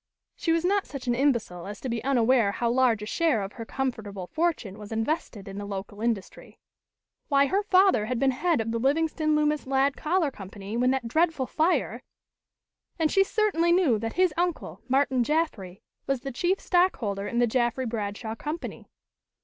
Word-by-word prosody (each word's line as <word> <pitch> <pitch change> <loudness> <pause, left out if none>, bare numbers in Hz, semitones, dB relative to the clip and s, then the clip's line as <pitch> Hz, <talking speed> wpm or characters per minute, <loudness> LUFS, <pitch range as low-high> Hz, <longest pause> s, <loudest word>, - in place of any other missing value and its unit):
She 330 - -1
was 330 +1 +1
not 400 +1 +1
such 275 -3 -7
an 240 - +1
imbecile 235 -10 0
as 205 0 -7
to - - -4
be 230 -2 -3
unaware 245 -5 +3
how 235 +1 0
large 240 -4 +2
a - - -4
share 285 - +1
of 195 - -7
her 230 - -7
comfortable 220 -8 -4
fortune 310 - -2
was 210 0 -10
invested 225 - -2
in 195 +1 -6
the 205 - -5
local 205 +1 -6
industry. 225 -5 -3 0.7
Why, 280 -1 +4
her 390 +8 +1
father 375 - +4
had 250 +1 -1
been 270 +2 +3
head 320 +1 +1
of 225 0 -3
the 230 - -1
Livingston 310 +3 +1
Loomis 300 -1 +1
Ladd 270 +1 +2
Collar 320 -2 0
Company, 200 0 -8
when 250 +2 +2
that 260 -2 0
dreadful 315 +1 +1
fire! 320 +7 0 1.0
And 320 -3 +1
she 390 - +5
certainly 390 -5 +1
knew 335 - +3
that 225 +1 -4
his 365 -3 +2
uncle, 350 -1 -2
Martin 265 -1 +2
Jaffry, 230 - -2 0.2
was 275 -2 0
the 275 - -5
chief 355 +10 0
stockholder 225 - +1
in 235 - -3
the 240 - +4
Jaffry 240 +2 0
Bradshaw 220 -1 -4
Company. 300 +8 -6
260 Hz, 180 wpm, -26 LUFS, 220-320 Hz, 1.0 s, she